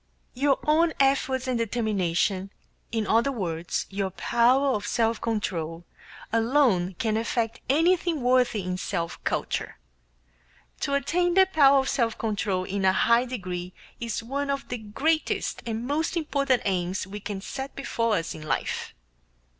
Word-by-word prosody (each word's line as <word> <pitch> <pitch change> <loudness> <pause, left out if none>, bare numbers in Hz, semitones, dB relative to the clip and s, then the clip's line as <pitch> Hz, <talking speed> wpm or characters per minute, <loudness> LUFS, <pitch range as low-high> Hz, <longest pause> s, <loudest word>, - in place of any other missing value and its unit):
Your 275 +2 +2
own 320 +2 +3
efforts 270 -1 +2
and 250 -2 0
determination 200 -4 0 0.4
in 220 -1 -1
other 230 +6 +3
words, 170 -8 -3
your 195 -1 -1
power 240 +8 +3
of 205 -2 -3
self 230 -1 +1
control 170 -7 -2 0.5
alone 225 -6 +2
can 220 +4 0
effect 230 0 -1
anything 330 +1 +2
worthy 250 -4 +3
in 180 0 -3
self 170 -4 -3
culture. - - -2 1.0
To 280 - 0
attain 345 +6 +1
the 380 0 +7
power 285 -7 +5
of 265 0 +1
self 235 -5 0
control 205 -4 -1
in 195 +1 -3
a 190 0 +4
high 235 +3 +4
degree 180 -7 -5 0.3
is 230 -1 -3
one 280 +4 -3
of 275 0 -2
the 245 - -3
greatest 285 +10 -1
and 225 +1 -3
most 315 +6 -1
important 280 -5 +1
aims 185 -1 -1
we 200 +2 -7
can 205 -1 -5
set 265 +7 -6
before 230 -5 0
us 165 -3 -2
in 155 - -9
life. 155 - -3
230 Hz, 145 wpm, -26 LUFS, 195-275 Hz, 1.0 s, the